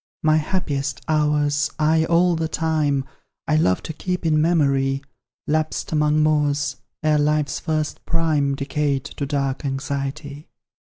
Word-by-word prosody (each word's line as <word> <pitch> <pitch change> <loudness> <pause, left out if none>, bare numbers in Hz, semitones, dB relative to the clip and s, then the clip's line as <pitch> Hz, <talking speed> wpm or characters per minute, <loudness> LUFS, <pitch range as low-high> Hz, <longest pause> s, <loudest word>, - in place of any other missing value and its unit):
My 155 0 +4
happiest 150 -4 -2
hours, 150 -1 +1
aye! 160 +1 +3
all 170 +1 +3
the 160 0 -1
time, 155 -4 0 0.4
I 155 - +2
love 90 -12 +2
to 160 - -5
keep 180 +2 -3
in 155 -1 +3
memory, 140 -4 +2 0.4
Lapsed 155 +1 -1
among 150 0 +2
moors, 145 -2 +1 0.3
ere 155 -1 +3
life's 150 0 +1
first 155 -2 -2
prime 155 -4 +1
Decayed 140 -1 -1
to 145 0 -5
dark 140 -2 -1
anxiety. 140 +2 -4
150 Hz, 130 wpm, -22 LUFS, 140-155 Hz, 0.4 s, My